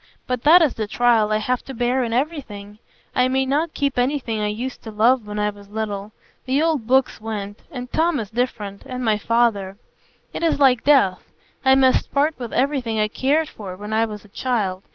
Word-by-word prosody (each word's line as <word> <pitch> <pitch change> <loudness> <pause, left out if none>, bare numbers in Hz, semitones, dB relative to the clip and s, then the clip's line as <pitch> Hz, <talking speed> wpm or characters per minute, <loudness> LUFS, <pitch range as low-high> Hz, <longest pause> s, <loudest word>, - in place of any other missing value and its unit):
But 250 -2 -2
that 330 +5 +7
is 300 - +2
the 215 -2 -4
trial 225 -1 +2
I 215 - +3
have 245 +4 -1
to 270 - -8
bear 245 +2 +1
in 230 - -3
everything; 225 -7 -4 0.3
I 250 0 +3
may 265 +1 +1
not 300 +5 -1
keep 280 -3 0
anything 245 -4 -1
I 210 - 0
used 240 +5 -4
to 225 - -8
love 225 +2 +2
when 210 0 -5
I 210 0 0
was 200 -1 -16
little. 210 -1 -4 0.3
The 260 +2 +1
old 310 -8 0
books 260 -2 +2
went; 205 -1 -5
and 250 -3 -7
Tom 325 -2 +2
is 215 -1 -6
different, 220 -4 -3
and 255 -1 -4
my 215 -2 +2
father. 210 -4 +1 0.6
It - - -5
is 330 -2 +2
like 255 -4 +4
death. 270 -11 +4 0.4
I 265 0 +5
must 265 -1 +3
part 290 +3 +2
with 240 -3 -6
everything 255 -5 0
I 215 0 +1
cared 290 +7 +1
for 195 -9 -8
when 210 +2 -6
I 225 +1 +3
was 210 -2 -8
a - - -18
child. 200 -6 -2
240 Hz, 210 wpm, -21 LUFS, 210-265 Hz, 0.6 s, that